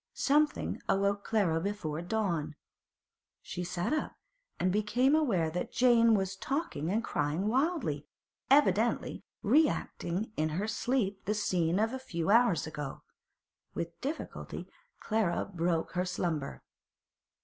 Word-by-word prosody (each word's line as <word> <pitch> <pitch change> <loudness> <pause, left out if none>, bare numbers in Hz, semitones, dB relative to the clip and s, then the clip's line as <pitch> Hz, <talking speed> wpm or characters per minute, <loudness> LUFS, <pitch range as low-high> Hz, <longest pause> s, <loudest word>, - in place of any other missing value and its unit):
Something 295 +2 +1
awoke 200 +1 +2
Clara 180 -8 +1
before 170 -6 -3
dawn. 175 -6 -1 0.9
She 180 - -5
sat 175 - -2
up, 310 - -2 0.4
and 185 - +2
became 230 +7 +2
aware 205 - +2
that 180 - -3
Jane 230 -2 +5
was 190 -1 -1
talking 270 - -2
and 220 +4 0
crying 150 +5 -1
wildly, 255 - 0 0.4
evidently 235 -5 +3 0.2
re 310 +1 +5
acting 190 -1 -3
in 155 +1 +1
her 205 +3 -1
sleep 210 -3 -1
the 210 - 0
scene 180 -4 +1
of 220 +3 +1
a 260 - -3
few 170 -7 -2
hours 230 -6 +4
ago. 150 -3 -6 0.7
With 170 0 -5
difficulty 290 +4 -5 0.3
Clara 215 -5 0
broke 165 -1 0
her 180 0 -1
slumber. 170 -5 -3
200 Hz, 125 wpm, -31 LUFS, 170-235 Hz, 0.9 s, Jane